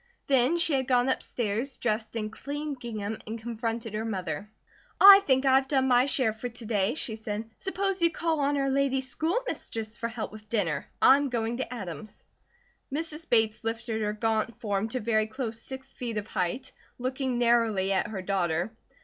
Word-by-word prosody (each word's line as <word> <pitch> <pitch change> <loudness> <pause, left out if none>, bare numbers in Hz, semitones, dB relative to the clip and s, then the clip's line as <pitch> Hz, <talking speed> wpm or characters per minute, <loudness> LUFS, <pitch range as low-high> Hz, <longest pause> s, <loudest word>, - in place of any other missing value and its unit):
Then 270 +4 +3
she 330 -2 +3
had 265 -2 +1
gone 250 0 +3
upstairs, 240 0 -1
dressed 220 -1 -2
in 215 -1 -2
clean 290 +5 -4
gingham 220 -4 -5
and 225 +1 -4
confronted 230 -1 -4
her 215 +1 -2
mother. 195 -2 -4 0.5
"I 395 0 +11
think 265 0 +3
I 265 - +5
have 265 0 +4
done 265 -2 +2
my 250 +1 +5
share 260 -7 +2
for 235 +3 -5
to 235 0 -8
day," 210 +1 +1
she 235 -7 -2
said. 220 0 -4
"Suppose 385 0 -1
you 335 - +5
call 330 -1 -1
on 285 0 +1
our 275 -1 +1
lady 275 -1 +2
school 315 - -1
mistress 225 - -4
for 230 - -2
help 230 -1 -5
with 215 0 -12
dinner. 175 -11 -1 0.2
I'm 280 +1 +6
going 235 -1 -1
to 260 - -4
Adam's." 215 -2 -7 0.7
Mrs. 320 +2 -5
Bates 220 -1 +2
lifted 225 0 -2
her 210 -1 0
gaunt 225 +1 -1
form 205 0 -1
to 255 +3 -2
very 215 -1 +1
close 230 -1 -4
six 265 0 -8
feet 235 -3 -4
of 205 - -2
height, 190 +4 -2 0.3
looking 255 0 -2
narrowly 230 -5 +2
at 190 - +1
her 195 -4 -5
daughter. 180 0 0
235 Hz, 185 wpm, -28 LUFS, 215-265 Hz, 0.7 s, I